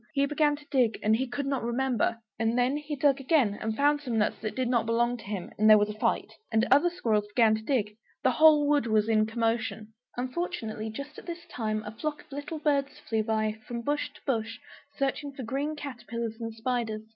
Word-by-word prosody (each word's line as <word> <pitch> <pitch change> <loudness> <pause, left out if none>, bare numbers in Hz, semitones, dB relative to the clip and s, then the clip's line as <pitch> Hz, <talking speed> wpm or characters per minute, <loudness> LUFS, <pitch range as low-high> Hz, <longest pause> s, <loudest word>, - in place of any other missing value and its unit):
He 280 0 +3
began 295 +1 +2
to 295 0 -14
dig, 250 -5 +3
and 215 +1 +4
he 260 +3 -1
could 270 +3 -3
not 275 -2 -1
remember. 240 -1 0 0.2
And 225 +2 +1
then 250 +3 +2
he 295 0 -4
dug 280 0 +3
again 265 -7 +2
and 220 0 -2
found 290 +1 +3
some 245 -5 -2
nuts 210 - +1
that 215 0 -4
did 255 -1 0
not 235 -2 +1
belong 240 +1 +2
to 220 - -12
him; 195 -3 -5
and 215 +1 +5
there 215 - +10
was 210 0 +2
a 210 - -11
fight. - - 0 0.2
And 225 +1 +3
other 290 +6 +6
squirrels 220 - 0
began 220 +1 +4
to 220 - -1
dig, 215 -4 -1 0.3
the 260 - +4
whole 300 +1 +6
wood 290 -4 +2
was 215 -1 +2
in 215 -1 +3
commotion! 225 -1 -2 0.2
Unfortunately, 250 -5 -3
just 280 +7 -7
at - - -15
this 340 0 -6
time 215 -9 -3
a 210 - -5
flock 300 +6 -4
of 300 - -30
little 290 +3 -5
birds 285 -2 0
flew 220 -1 -1
by, 215 0 -1
from 235 -1 -4
bush 290 +3 -1
to - - -16
bush, 225 -4 -1 0.4
searching 275 +1 -1
for 270 - -7
green 280 +6 -2
caterpillars 235 -5 -5
and 225 -1 -5
spiders. 225 -2 -2
240 Hz, 220 wpm, -28 LUFS, 220-285 Hz, 0.4 s, there